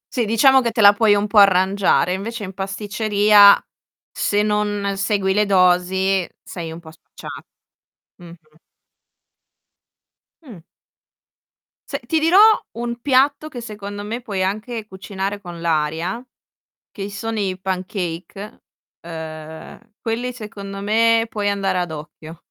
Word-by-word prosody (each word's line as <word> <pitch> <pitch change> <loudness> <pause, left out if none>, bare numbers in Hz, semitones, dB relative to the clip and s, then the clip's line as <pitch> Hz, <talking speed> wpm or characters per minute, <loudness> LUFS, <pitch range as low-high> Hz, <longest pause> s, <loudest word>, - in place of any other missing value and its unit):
Sì, 240 -3 +1
diciamo 260 +5 +4
che 235 - 0
te 225 - -1
la 205 0 +8
puoi 210 0 +3
un 205 0 0
po' 210 0 +3
arrangiare, 190 -1 +3
invece 215 +4 -5
in 190 -1 -7
pasticceria 205 +1 +4 0.5
se 205 0 0
non 210 -1 -1
segui 195 -1 0
le 210 0 +1
dosi 185 0 +2
sei 165 -3 -7
un 165 - -8
po' 160 -2 -13
spacciato, 160 - -12 0.7
mh-mh. 165 -3 -16 1.9
Mh. 220 - -13 1.3
Se - - -3
ti 320 - +1
dirò 330 +4 +3 0.4
un 235 0 -4
piatto 285 +3 +2
che 245 - -8
secondo 205 -2 -7
me 225 +4 -5
puoi 205 -6 -4
anche 215 +3 -4
cucinare 195 +1 -5
con 175 -2 -9
l'aria, 165 +7 -2 0.7
che 200 -1 -6
sono 225 +2 -4
i 190 -2 -2
pancake, 185 +1 -5 0.4
ehm, 160 +6 -10
quelli 235 +2 -3
secondo 200 -4 -8
me 225 +2 +3
puoi 205 -2 -2
andare 195 -2 -1
ad 175 -2 -3
occhio. 155 +1 -10
200 Hz, 130 wpm, -20 LUFS, 185-220 Hz, 1.9 s, la